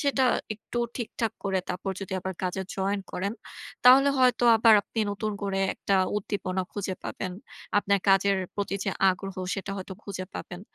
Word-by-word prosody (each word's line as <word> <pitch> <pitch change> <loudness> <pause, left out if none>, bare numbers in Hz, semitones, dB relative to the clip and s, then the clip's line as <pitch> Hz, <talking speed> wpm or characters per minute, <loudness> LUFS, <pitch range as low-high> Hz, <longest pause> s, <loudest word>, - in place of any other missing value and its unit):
সেটা 280 -2 +2 0.3
একটু 220 +3 -6 0.2
ঠিকঠাক 230 -2 -2
করে 190 -1 +1
তারপর 195 +2 -3
যদি 190 -1 -6
আবার 190 +1 -3
কাজে 185 +1 -1
join 195 +1 0
করেন। 200 +3 -2 0.5
তাহলে 270 +3 +8
হয়তো 250 -1 +4
আবার 225 0 +7
আপনি 225 - -4
নতুন 210 +1 -2
করে 195 -1 -1
একটা 195 - +1 0.2
উদ্দীপনা 190 -2 -2
খুঁজে 195 -2 -3
পাবেন। 185 -1 -4 0.5
আপনার 200 0 +2
কাজের 195 0 +5 0.2
প্রতি 200 -1 -2
যে 195 - 0 0.2
আগ্রহ 195 +1 -5 0.2
সেটা 195 0 -5
হয়তো 190 0 -6
খুঁজে 190 -2 -5
পাবেন। 175 0 -7
200 Hz, 160 wpm, -27 LUFS, 190-215 Hz, 0.5 s, তাহলে